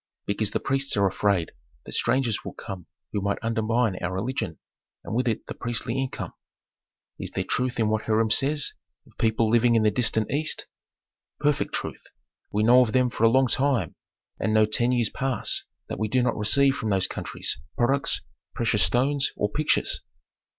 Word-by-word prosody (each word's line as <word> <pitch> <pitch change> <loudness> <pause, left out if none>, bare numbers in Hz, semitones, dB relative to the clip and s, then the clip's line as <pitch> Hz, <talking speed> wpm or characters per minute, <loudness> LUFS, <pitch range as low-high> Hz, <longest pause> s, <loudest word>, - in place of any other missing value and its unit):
"Because 100 +1 -1
the - - -1
priests 135 -3 0
are 100 - +4
afraid 95 -2 +1 0.3
that - - -9
strangers 120 -2 +1
would - - -8
come 95 -5 -7 0.3
who 105 - 0
might 100 +1 0
undermine 115 -2 +1
our 90 0 -3
religion, 100 - -3 0.5
and - - -6
with 125 +2 +1
it 110 - -1
the - - -6
priestly 120 0 -3
income." 135 -1 -3 0.9
"Is - - -5
there - - -2
truth 125 -1 -1
in 110 - +3
what 110 0 0
Hiram 110 0 +2
says 145 +5 +1 0.3
of - - -22
people 110 0 +2
living 120 +1 +4
in 110 - +4
the 105 - +4
distant 110 -3 +1
East?" 155 +2 0 0.7
"Perfect 150 -1 +1
truth. - - -4 0.5
We 105 +1 +1
know 125 +3 +7
of 115 -4 +1
them 125 -1 +3
for 115 - +1
a - - +7
long 130 +3 +4
time, 130 - +1 0.5
and 110 - +1
no 110 0 +6
ten 120 +3 +1
years 120 -3 +1
pass 135 -2 -1 0.2
that - - -5
we 110 - 0
do 125 +3 +2
not 125 -2 +1
receive 135 +6 +3
from 110 - -2
those 95 -2 +2
countries - - -3 0.2
products, 120 -9 +2 0.3
precious 115 -4 +1
stones, 135 +7 +2
or 105 - 0
pictures." 150 +6 +1
115 Hz, 180 wpm, -26 LUFS, 105-130 Hz, 0.9 s, know